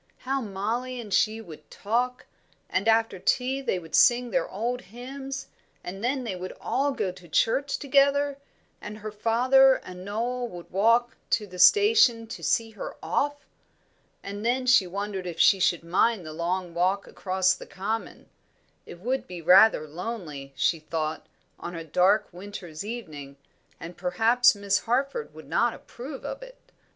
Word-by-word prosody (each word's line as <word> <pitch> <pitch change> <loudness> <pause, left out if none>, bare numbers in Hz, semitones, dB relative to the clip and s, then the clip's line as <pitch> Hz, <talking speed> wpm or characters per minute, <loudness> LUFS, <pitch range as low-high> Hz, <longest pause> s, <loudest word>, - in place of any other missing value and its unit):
How 270 +1 -2
Mollie 230 +5 -3
and 215 -4 -6
she 220 +1 +2
would 165 -8 -13
talk! 245 +4 -2 0.5
And 190 +4 0
after 225 -3 +2
tea 260 +7 0
they 260 - -1
would 165 -3 -10
sing 245 -1 +4
their - - 0
old 240 +5 -3
hymns, 265 +6 -7 0.4
and 195 +4 -7
then 260 +2 0
they 215 -6 -4
would 185 +1 -7
all 280 +2 0
go 195 -8 -2
to 180 -1 -15
church 275 - +1
together, 280 0 +2 0.4
and 210 +1 -7
her 215 0 -7
father 255 +5 +4
and 180 0 -9
Noel 240 +5 -2
would 175 -6 -11
walk 230 +5 +2
to 210 - +1
the 180 -2 -11
station 410 - +5
to - - -7
see 225 -1 +1
her 215 - -7
off. 290 0 -1 0.8
And 200 +1 -6
then 250 +2 +1
she 250 -7 +5
wondered 195 0 -4
if 170 - -6
she 195 - +6
should 175 -3 +1
mind 185 +3 +1
the 155 - -7
long 175 +2 -2
walk 185 +4 +1
across 185 -1 +1
the - - -10
common; 215 +4 -5 0.6
it 175 - -10
would 260 +5 -2
be 180 -1 -7
rather 180 -1 +6
lonely, 155 -5 -6
she 165 - +1
thought, 155 0 -4 0.3
on 175 - -6
a 165 - -5
dark 185 +6 +3
winter's 180 -3 -8
evening, 155 -12 -7 0.4
and 170 +2 -8
perhaps 225 +8 +3
Miss 200 -1 +1
Harford 275 - -1
would - - -12
not - - +1
approve 265 +3 -9
of - - -5
it. - - -12
215 Hz, 165 wpm, -26 LUFS, 180-250 Hz, 0.8 s, she